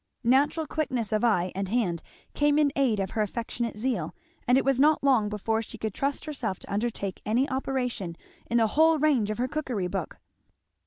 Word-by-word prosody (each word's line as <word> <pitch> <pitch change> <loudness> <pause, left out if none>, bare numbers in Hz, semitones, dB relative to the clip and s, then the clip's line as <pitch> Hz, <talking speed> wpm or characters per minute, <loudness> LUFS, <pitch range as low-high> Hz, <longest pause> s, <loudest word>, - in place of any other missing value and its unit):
Natural 285 +6 +3
quickness 260 -7 -2
of 215 +1 +1
eye 185 -6 +2
and 195 0 -3
hand 190 -7 0 0.3
came 295 0 +2
in 295 -2 +3
aid 255 -7 +2
of 190 -1 -2
her 220 - -1
affectionate 230 +1 -3
zeal, 250 +3 -2 0.3
and 250 +1 +5
it - - +1
was 270 -2 +2
not 300 +1 +4
long 250 -7 +3
before 220 +2 -1
she 225 - -9
could 220 -2 -3
trust 280 +5 -2
herself 260 - -3
to - - -8
undertake 205 -3 -2
any 240 +6 +1
operation 250 -9 -2 0.3
in 235 - +2
the 230 - +4
whole 320 +1 +5
range 280 -8 +2
of 215 - -2
her 250 +2 0
cookery 255 -9 -2
book. 180 -2 -4
240 Hz, 195 wpm, -27 LUFS, 210-275 Hz, 0.3 s, and